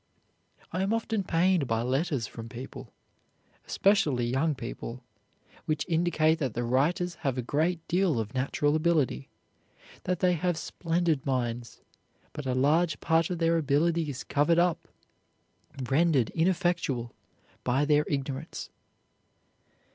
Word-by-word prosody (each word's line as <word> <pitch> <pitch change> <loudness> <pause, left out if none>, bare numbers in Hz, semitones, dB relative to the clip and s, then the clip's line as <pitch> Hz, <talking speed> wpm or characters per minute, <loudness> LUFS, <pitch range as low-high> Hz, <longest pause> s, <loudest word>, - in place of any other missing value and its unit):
I 185 - -1
am 200 +4 +1
often 225 -2 -1
pained 175 -3 +2
by 115 0 0
letters 135 0 0
from 115 +1 -9
people, 130 0 -9 0.8
especially 150 - +2
young 135 +6 +1
people, 120 0 -7 0.6
which 155 -2 -1
indicate 165 -2 +2
that 130 -7 -2
the 120 - -1
writers 150 +9 +1
have 135 -4 -1
a 125 - -1
great 160 +6 -1
deal 175 -7 +2
of 110 +1 -4
natural 140 +3 +1
ability, 155 -4 +1 0.8
that 180 0 0
they 180 -1 +3
have 175 0 0
splendid 165 -3 -1
minds, 120 -3 -2 0.5
but 150 -3 -6
a 130 - 0
large 155 +5 +2
part 165 0 +2
of 180 - -2
their 165 0 +2
ability 160 +2 +1
is 140 -1 -5
covered 150 +4 +2
up, 175 -1 +1 1.0
rendered 140 -4 +2
ineffectual 165 -8 0 0.5
by 130 +4 +2
their 150 0 +3
ignorance. 140 +2 -4
150 Hz, 130 wpm, -28 LUFS, 130-170 Hz, 1.0 s, they